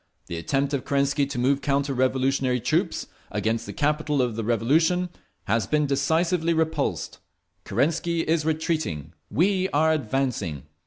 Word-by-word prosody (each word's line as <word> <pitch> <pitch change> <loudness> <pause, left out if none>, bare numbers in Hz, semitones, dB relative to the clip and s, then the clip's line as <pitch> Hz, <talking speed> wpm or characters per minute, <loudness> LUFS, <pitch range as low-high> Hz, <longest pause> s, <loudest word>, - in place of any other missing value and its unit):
The 85 - -5
attempt 135 - -1
of 140 - -1
Kerensky 140 0 +1
to 140 -2 -5
move 135 +3 +2
counter 140 -1 0
revolutionary 130 0 +1
troops - - 0 0.2
against 115 +1 -1
the - - -4
capital 150 -1 0
of 125 -3 +1
the 115 - -3
Revolution 160 +11 +2 0.3
has 110 -1 0
been 150 +4 +2
decisively 165 +4 +1
repulsed. 160 -3 -1 0.5
Kerensky 165 +9 0
is 160 -1 +2
retreating, 155 - -2 0.2
we 190 +3 +2
are 160 -1 +3
advancing. 120 - -1
140 Hz, 140 wpm, -25 LUFS, 125-160 Hz, 0.5 s, are